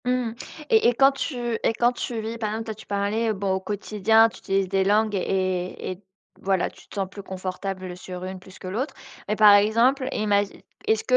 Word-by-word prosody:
Mmh 250 Hz, -2 st, 0 dB, 0.4 s
et 445 Hz, -, +5 dB
et 240 Hz, -, +4 dB
quand 270 Hz, +2 st, +6 dB
tu 275 Hz, +1 st, -4 dB, 0.3 s
et -, -, +2 dB
quand 240 Hz, +2 st, +3 dB
tu 240 Hz, -1 st, -4 dB
vis 225 Hz, +1 st, -5 dB
par 215 Hz, -2 st, -1 dB
exemple, 220 Hz, +1 st, -3 dB
toi, 220 Hz, -, -4 dB
tu 215 Hz, +1 st, -14 dB
parlais, 205 Hz, +3 st, 0 dB
heu, -, -, +1 dB
bon, 195 Hz, -1 st, -2 dB
au 190 Hz, -, 0 dB
quotidien, 215 Hz, +3 st, +3 dB
tu -, -, -14 dB
utilises 195 Hz, 0 st, 0 dB
des 195 Hz, +1 st, +1 dB
langues 210 Hz, +2 st, +2 dB
et 185 Hz, -1 st, -1 dB
et 185 Hz, +2 st, -9 dB, 0.4 s
voilà, 190 Hz, -2 st, +1 dB
tu -, -, -19 dB
te -, -, -13 dB
sens 195 Hz, -2 st, -1 dB
plus 200 Hz, +1 st, -9 dB
confortable 185 Hz, -1 st, -5 dB
sur 180 Hz, 0 st, -8 dB
une 190 Hz, 0 st, -6 dB
plus 185 Hz, +1 st, -15 dB
que 185 Hz, -, -9 dB
l'autre 255 Hz, +9 st, -3 dB, 0.3 s
mais 210 Hz, -, 0 dB
par 210 Hz, -1 st, +8 dB
exemple, 230 Hz, +6 st, +4 dB
imagi 205 Hz, -1 st, 0 dB, 0.2 s
est-ce 220 Hz, 0 st, +2 dB
205 Hz, 215 wpm, -24 LUFS, 190-225 Hz, 0.4 s, par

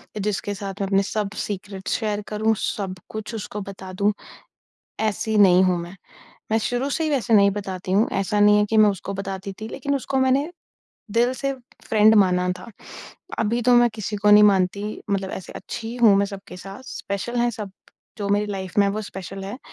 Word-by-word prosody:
इ -, -, -4 dB
जिसके 205 Hz, 0 st, -2 dB
साथ 195 Hz, 0 st, -5 dB
मैं 195 Hz, -, 0 dB
अपने 195 Hz, 0 st, +3 dB
सब 210 Hz, 0 st, -2 dB, 0.2 s
सीक्रेट 195 Hz, -1 st, -6 dB
शेयर 210 Hz, -2 st, -1 dB
करूँ, 220 Hz, +1 st, +1 dB
सब 195 Hz, -2 st, -3 dB
कुछ 220 Hz, +1 st, -6 dB
उसको 210 Hz, -1 st, -5 dB
बता 195 Hz, -1 st, -8 dB
दूँ, 200 Hz, +3 st, +1 dB, 0.9 s
ऐसी 220 Hz, 0 st, 0 dB
नहीं 185 Hz, -2 st, +7 dB
हूँ 180 Hz, -1 st, +2 dB
मैं। 175 Hz, +3 st, -10 dB, 0.6 s
मैं 220 Hz, -, +4 dB
शुरू 245 Hz, +5 st, -1 dB
से 320 Hz, +3 st, -1 dB
ही 310 Hz, -, 0 dB
वैसे 255 Hz, -5 st, 0 dB
नहीं 200 Hz, -1 st, +6 dB
बताती 190 Hz, -2 st, -5 dB
हूँ, 205 Hz, +5 st, +3 dB
ऐसा 200 Hz, +2 st, 0 dB
नहीं 210 Hz, 0 st, +6 dB
है 210 Hz, -, +3 dB
कि 225 Hz, -, +2 dB
मैं 215 Hz, -1 st, +7 dB
उसको 200 Hz, 0 st, -4 dB
बताती 195 Hz, 0 st, -5 dB
थी, 220 Hz, -, -4 dB
लेकिन 280 Hz, +3 st, -2 dB
उसको 275 Hz, 0 st, -2 dB
मैंने 265 Hz, +4 st, +2 dB, 0.6 s
दिल 235 Hz, +4 st, +2 dB
से 275 Hz, +1 st, -2 dB, 0.4 s
फ्रेंड 215 Hz, 0 st, +5 dB
माना 180 Hz, -3 st, +3 dB
था। 235 Hz, -, -11 dB, 0.7 s
अभी 225 Hz, +2 st, +1 dB
तो 250 Hz, +2 st, +4 dB
मैं 240 Hz, 0 st, +6 dB
किसी 215 Hz, -1 st, -4 dB
को 205 Hz, +1 st, +3 dB
नहीं 210 Hz, 0 st, +8 dB
मानती, 200 Hz, +1 st, +1 dB
मतलब 195 Hz, -1 st, -1 dB
ऐसे 190 Hz, -, -7 dB
अच्छी 225 Hz, -, -6 dB
ही 235 Hz, -, -6 dB
हूँ 230 Hz, -4 st, +6 dB
मैं 200 Hz, 0 st, +2 dB
सबके 195 Hz, -2 st, -9 dB
साथ, 195 Hz, +5 st, -10 dB
स्पेशल 220 Hz, -1 st, -4 dB
हैं 240 Hz, 0 st, +2 dB
सब, 210 Hz, -4 st, -7 dB, 0.5 s
जो 200 Hz, -1 st, -2 dB
मेरी 205 Hz, +1 st, +2 dB
लाइफ़ 190 Hz, -2 st, -5 dB
में -, -, +5 dB
हैं, 200 Hz, -, 0 dB
वो 215 Hz, -, -2 dB
स्पेशल 195 Hz, -1 st, -7 dB
हैं। 205 Hz, +6 st, -6 dB
205 Hz, 205 wpm, -23 LUFS, 195-220 Hz, 0.9 s, नहीं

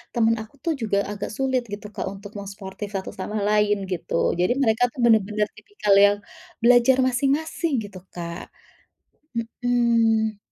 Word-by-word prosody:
Teman 230 Hz, -1 st, +3 dB
aku 220 Hz, +5 st, -12 dB
tuh 335 Hz, -, +1 dB
juga 215 Hz, -3 st, 0 dB
agak 205 Hz, 0 st, -4 dB
sulit 260 Hz, -1 st, +1 dB
gitu, 210 Hz, +1 st, -6 dB
Kak, 200 Hz, -, -3 dB
untuk 200 Hz, +1 st, -10 dB
mau 200 Hz, -, -7 dB
suportif 195 Hz, 0 st, -7 dB
satu 190 Hz, -1 st, -3 dB
sama 210 Hz, +3 st, -3 dB
lain 210 Hz, 0 st, +3 dB
gitu. 180 Hz, -, -4 dB, 0.3 s
Jadi 180 Hz, +4 st, +2 dB
mereka 225 Hz, -2 st, +2 dB
tuh 250 Hz, -, -13 dB
benar-benar 210 Hz, -2 st, +3 dB
tipikal 210 Hz, -, -1 dB
yang 205 Hz, 0 st, +3 dB, 0.5 s
belajar 245 Hz, +2 st, +6 dB
masing-masing 285 Hz, +5 st, 0 dB
gitu, 200 Hz, -2 st, -9 dB
Kak. 170 Hz, 0 st, -6 dB, 0.9 s
Mhm. 230 Hz, -2 st, +1 dB
220 Hz, 150 wpm, -24 LUFS, 205-245 Hz, 0.9 s, belajar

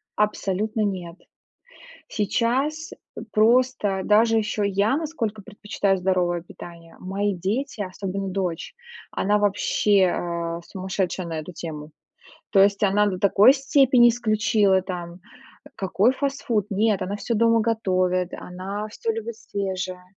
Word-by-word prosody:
Абсолютно 210 Hz, +1 st, -1 dB
нет. 180 Hz, -4 st, -4 dB, 0.9 s
Сейчас 260 Hz, +9 st, -1 dB, 0.4 s
просто 220 Hz, -3 st, +2 dB
даже 225 Hz, +2 st, +4 dB
ещё 210 Hz, -1 st, -2 dB
я 200 Hz, +5 st, +1 dB
насколько 250 Hz, -10 st, -3 dB
предпочитаю 200 Hz, -2 st, -2 dB
здоровое 180 Hz, -2 st, 0 dB
питание. 170 Hz, -1 st, -13 dB
Мои 195 Hz, +2 st, -2 dB
дети, 215 Hz, +7 st, -3 dB
особенно 195 Hz, 0 st, -4 dB
дочь, 185 Hz, -3 st, -3 dB, 0.4 s
она 205 Hz, +2 st, +1 dB
вообще, 205 Hz, 0 st, +2 dB
э, 170 Hz, -1 st, -3 dB
сумасшедшая 185 Hz, -1 st, -3 dB
на 165 Hz, -1 st, -4 dB
эту 155 Hz, +4 st, -9 dB
тему. 155 Hz, -2 st, -7 dB, 0.6 s
То 195 Hz, -, +5 dB
есть 200 Hz, +1 st, +3 dB
она 205 Hz, +1 st, +3 dB
до 190 Hz, -2 st, -2 dB
такой 200 Hz, +6 st, +6 dB
степени 270 Hz, -3 st, +4 dB
исключила 215 Hz, -4 st, +2 dB
там 175 Hz, -2 st, -7 dB, 0.6 s
Какой 195 Hz, +4 st, +2 dB
фастфуд? 260 Hz, -7 st, -1 dB
Нет, 205 Hz, 0 st, +1 dB
она 190 Hz, +2 st, -3 dB
всё 230 Hz, +3 st, -2 dB
дома 230 Hz, +1 st, +3 dB
готовит, 185 Hz, -5 st, 0 dB
она 195 Hz, +4 st, -6 dB
всё 225 Hz, -, -2 dB
любит 225 Hz, 0 st, -6 dB
свежее. 185 Hz, -4 st, -4 dB
200 Hz, 120 wpm, -23 LUFS, 185-225 Hz, 0.9 s, такой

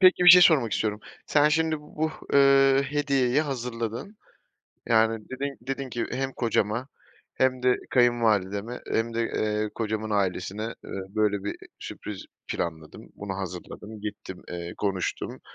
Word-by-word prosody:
peki 185 Hz, -1 st, +6 dB
bir -, -, +9 dB
şey 180 Hz, 0 st, +10 dB
sormak 135 Hz, -10 st, +5 dB
istiyorum 105 Hz, -1 st, -1 dB, 0.3 s
Sen 150 Hz, 0 st, +4 dB
şimdi 160 Hz, 0 st, +1 dB
bu, 155 Hz, +1 st, -3 dB, 0.2 s
ııı, 135 Hz, 0 st, +6 dB
hediyeyi 140 Hz, -2 st, +1 dB
hazırladın. 125 Hz, -, -4 dB, 0.7 s
Yani 110 Hz, -1 st, +2 dB
dedin 140 Hz, +2 st, -4 dB
dedin 135 Hz, +2 st, -4 dB
ki 120 Hz, -1 st, -2 dB
hem 135 Hz, +1 st, -2 dB
kocama 115 Hz, +1 st, 0 dB, 0.5 s
hem 130 Hz, -1 st, +1 dB
de 125 Hz, 0 st, +4 dB
kayınvalideme 115 Hz, -3 st, +2 dB
hem 115 Hz, +1 st, 0 dB
de, 115 Hz, -, 0 dB
eee, 105 Hz, -1 st, -1 dB
kocamın 110 Hz, -1 st, -2 dB
ailesine, 100 Hz, 0 st, -1 dB, 0.2 s
eee, -, -, -9 dB, 0.2 s
böyle 105 Hz, -1 st, 0 dB
bir 100 Hz, -, -3 dB, 0.2 s
sürpriz 105 Hz, -3 st, -7 dB, 0.2 s
planladım. 80 Hz, -2 st, -5 dB
Bunu 100 Hz, -1 st, -5 dB
hazırladım, 95 Hz, +3 st, -7 dB
gittim, 100 Hz, -3 st, -7 dB
eee, 85 Hz, 0 st, -5 dB
konuştum, 95 Hz, -3 st, -2 dB
115 Hz, 135 wpm, -26 LUFS, 105-135 Hz, 0.7 s, şey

